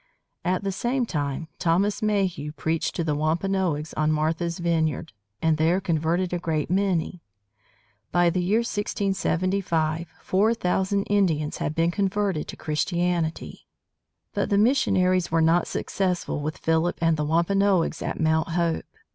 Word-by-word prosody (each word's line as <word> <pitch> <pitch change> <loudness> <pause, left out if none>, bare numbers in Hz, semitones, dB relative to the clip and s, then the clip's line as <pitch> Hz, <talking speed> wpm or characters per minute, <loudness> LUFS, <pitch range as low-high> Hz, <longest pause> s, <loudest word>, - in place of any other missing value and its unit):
At 185 +2 0
the 195 - -1
same 240 +6 -1
time, 145 -4 -3
Thomas 195 +7 +1
Mayhew 190 -8 0
preached 160 +1 -2
to 170 - -1
the 155 -2 0
Wampanoags 160 0 0
on 155 0 +1
Martha's 160 +2 0
Vineyard, 160 -4 -1 0.3
and 160 -1 +3
there 165 +4 +3
converted 175 0 0
a 175 - 0
great 160 -2 -2
many. 185 -2 0 0.9
By 175 -1 +3
the 180 - 0
year 205 +6 +2
1675, 185 -6 -1
four 215 +5 +2
thousand 190 0 0
Indians 170 -8 +1
had 150 - -3
been 165 +1 +2
converted 195 -3 -1
to - - -8
Christianity. 170 +1 -2 0.7
But - - -1
the 200 - +2
missionaries 185 -6 +3
were 165 - +3
not 165 +2 +3
successful 180 -5 -2
with 155 0 -3
Philip 160 +2 +1
and 165 -1 +3
the 150 - -1
Wampanoags 170 +2 +2
at - - -3
Mount 160 0 +2
Hope. 170 -1 0
170 Hz, 140 wpm, -25 LUFS, 160-195 Hz, 0.9 s, and